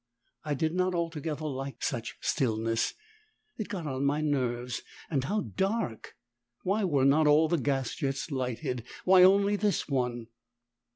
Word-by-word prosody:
I 150 -2 -1
did 160 +4 0
not 185 0 +1
altogether 160 -2 -3
like 135 -1 -5
such 120 -4 -3
stillness, 115 -2 0 0.6
it 215 - -2
got 180 -5 -4
on 135 -2 -2
my 145 +2 +2
nerves. 125 -5 -1 0.3
And 135 -4 0
how 210 +8 0
dark! 195 - -2 0.5
Why 205 +3 +1
were 145 -8 +2
not 150 +3 +5
all 150 +2 +5
the 170 - +1
gas 135 -2 -1
jets 140 +2 -3
lighted 125 -2 -2 0.2
why 185 0 +7
only 200 +2 +5
this 205 -1 0
one? 125 -4 -1
145 Hz, 150 wpm, -29 LUFS, 130-180 Hz, 0.6 s, why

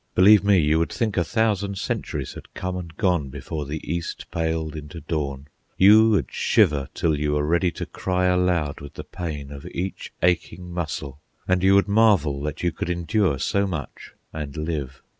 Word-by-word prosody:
Believe 100 +2 +7
me, 100 -1 +4
you 80 -1 +3
would 85 - 0
think 115 -5 -1
a 85 - +2
thousand 100 -1 0
centuries - - -3
had - - -13
come 90 0 -3
and 85 -3 -7
gone 90 -9 +1
before 75 +2 -5
the 75 +2 -6
east 85 0 -4
paled 80 -2 -2
into 75 +2 -8
dawn; 70 -4 -3 0.3
you 110 +4 +7
would 100 - +1
shiver 70 -2 +2
till 80 -2 +1
you 75 0 0
were 75 0 +1
ready 85 +3 +2
to 85 - -5
cry 90 0 -1
aloud 90 -5 +1
with 70 0 -10
the - - -6
pain 75 -5 -6
of 70 -1 -9
each 95 +2 -5
aching 90 0 0
muscle; 75 -5 -4 0.3
and 90 -1 +2
you 95 +1 +5
would 100 - +4
marvel 100 -10 +3
that 75 +2 -4
you 85 - +2
could 85 - -5
endure 90 -2 +1
so 100 +8 0
much 85 -6 -6 0.2
and 75 -2 -6
live. 75 -4 -4
85 Hz, 185 wpm, -24 LUFS, 75-95 Hz, 0.3 s, Believe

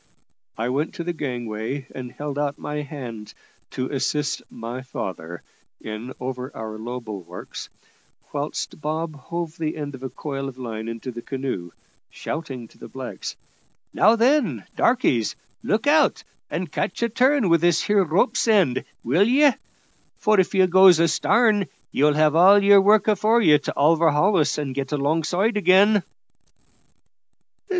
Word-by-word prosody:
I 115 +2 -2
went 145 +5 -2
to 170 - -4
the 175 +1 -3
gangway, 125 -2 -4
and 125 -2 -7
held 145 -1 -5
out 145 -1 -2
my 150 - -5
hand 120 -7 -8 0.3
to 130 -1 -3
assist 145 +1 -1
my 120 +3 -7
father 85 -9 -7 0.4
in 110 +4 -7
over 130 0 -5
our 110 -1 -6
low 120 +3 -5
bulwarks, 105 -7 -9 0.6
whilst 145 +1 -4
Bob 155 +1 -3
hove 170 +3 -6
the 155 -1 -3
end 145 -2 -5
of 130 - -10
a 130 - -5
coil 135 -1 -5
of 130 - -13
line 115 -3 -6
into 115 +3 -6
the 120 0 -8
canoe, 130 -10 -4 0.4
shouting 135 -7 -6
to - - -23
the - - -9
blacks, - - -7 0.6
"Now 220 +3 +5
then, 230 - +1
darkies, 185 - +1 0.3
look 220 +5 -1
out, 300 +1 +3 0.3
and 175 -4 -4
catch 185 - -2
a 235 - +1
turn 255 0 +2
with 170 -2 +3
this 170 -1 +3
here 205 -1 +3
rope's 180 - +1
end, 190 - +3 0.2
will 165 - +3
ye? 280 +4 +5 0.7
for 215 -2 +2
if 190 +1 +1
you 190 -1 +5
goes 185 -1 +6
astarn, 205 +4 +2 0.2
you'll 145 +1 +2
have 155 0 +3
all 195 +4 +6
your 200 0 +7
work 210 +1 +4
afore 215 +3 +3
ye 155 -5 +6
to - - -6
overhaul 165 +5 +3
us 150 - +1
and 145 -3 -3
get 135 +1 -4
alongside 165 +9 0
again." 200 +1 +4
150 Hz, 155 wpm, -23 LUFS, 130-195 Hz, 0.7 s, your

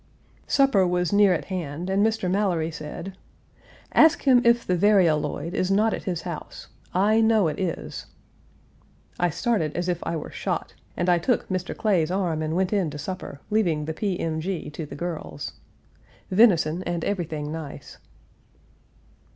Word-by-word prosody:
Supper 270 -10 +4
was 180 +1 0
near 200 -1 +6
at 175 - 0
hand, 175 -3 -4
and 195 +1 +2
Mr. 220 -3 +1
Mallory 180 -4 0
said: 155 +5 -7 0.8
"Ask 315 0 +5
him 255 -3 +5
if 235 0 +3
the 180 - +1
varioloid 170 -5 +2
is 185 -1 0
not 215 +3 +3
at - - -5
his 175 -3 -2
house. 170 -3 -7 0.2
I 210 +4 +3
know 220 -5 +4
it 150 - -3
is." 185 -3 -4 1.1
I 175 - +2
started 170 - -1
as 175 +1 -1
if 175 -2 0
I 165 - -3
were 155 - -5
shot, - - -3 0.2
and 175 - 0
I 175 -1 +4
took 240 +7 0
Mr. 185 -1 -3
Clay's 185 -8 +2
arm 180 -4 -1
and 155 +1 -2
went 190 +2 +1
in 190 -6 +1
to 150 - -7
supper, 150 -2 -6
leaving 170 -9 +1
the 160 - -3
P. 190 +2 -2
M. 160 -1 -2
G. 175 -3 -4
to 150 0 -6
the - - -8
girls. 150 - -5 0.8
Venison 180 -5 +4
and 175 -2 -3
everything 155 -6 -3
nice. 155 -3 -8
180 Hz, 165 wpm, -25 LUFS, 160-200 Hz, 1.1 s, near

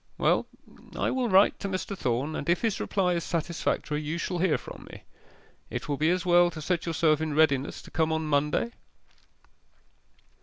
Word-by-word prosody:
Well, - - +2 0.5
I - - 0
will 255 -2 0
write 195 +1 +5
to 200 - -4
Mr. 190 +1 -3
Thorn, 135 0 -1
and 145 - -4
if 170 - +2
his 225 -3 0
reply 185 -3 0
is 170 -1 -1
satisfactory, 160 -3 -2
you 155 +2 -3
shall 175 +1 -3
hear 180 -3 +2
from - - -11
me. - - -12 0.7
It - - -5
will 145 - -1
be 155 +3 +2
as 180 0 0
well 175 0 +5
to 165 - -8
set 170 +2 -2
yourself 160 -2 +2
in 155 -2 -2
readiness 145 -3 +2
to - - -14
come 160 -1 +1
on 160 0 -1
Monday. 150 +9 +1
165 Hz, 185 wpm, -27 LUFS, 155-180 Hz, 0.7 s, write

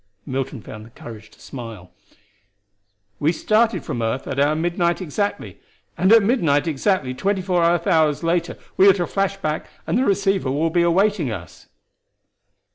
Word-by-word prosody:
Milton 130 -2 -4
found 110 0 -10
the 110 - -14
courage 110 -2 -11
to - - -23
smile. 115 -8 -9 1.3
"We 150 +2 +2
started 220 +6 +1
from 120 - -4
earth 115 +4 -2
at 140 -1 -3
our 145 +2 +3
midnight 170 +1 0
exactly, 200 +4 -3 0.4
and 185 +3 +2
at 225 -2 +7
midnight 170 - +2
exactly 155 -2 0
twenty 190 +7 -1
four 180 -2 +1
earth 170 0 +2
hours 160 -5 +2
later, 170 0 -1 0.2
we 195 +1 +7
are - - +7
to 180 -2 -1
flash 195 +2 -1
back 155 -5 -3 0.2
and 235 - 0
the - - +2
receiver 195 - +1
will 160 +4 0
be 175 +1 +2
awaiting 175 - +2
us." 90 -6 -9
170 Hz, 165 wpm, -21 LUFS, 135-195 Hz, 1.3 s, at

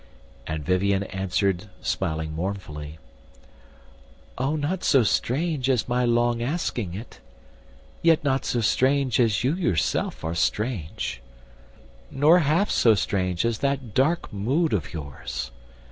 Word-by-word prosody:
And 80 -2 -4
Vivien 95 +2 +2
answered 95 +1 -1
smiling 80 -4 -2
mournfully: 80 -4 -5 1.4
"O 135 +4 -1
not 155 +5 -2
so 135 -3 +5
strange 135 - 0
as 125 -5 +1
my 125 0 +1
long 120 0 +2
asking 120 - -2
it, 110 +5 -9 0.8
Not 165 -3 +4
yet 135 - -2
so 120 - 0
strange 130 +2 +2
as 115 -3 +2
you 130 +4 +2
yourself 165 - 0
are 80 +1 -2
strange, 85 - -2 0.9
Nor 150 +6 +5
half 165 +7 +2
so 115 -2 +5
strange 95 -1 0
as 115 -2 0
that 135 -5 -1
dark 155 +3 +1
mood 130 - +1
of 95 -7 -1
yours. 70 -5 -6
115 Hz, 125 wpm, -25 LUFS, 90-135 Hz, 1.4 s, so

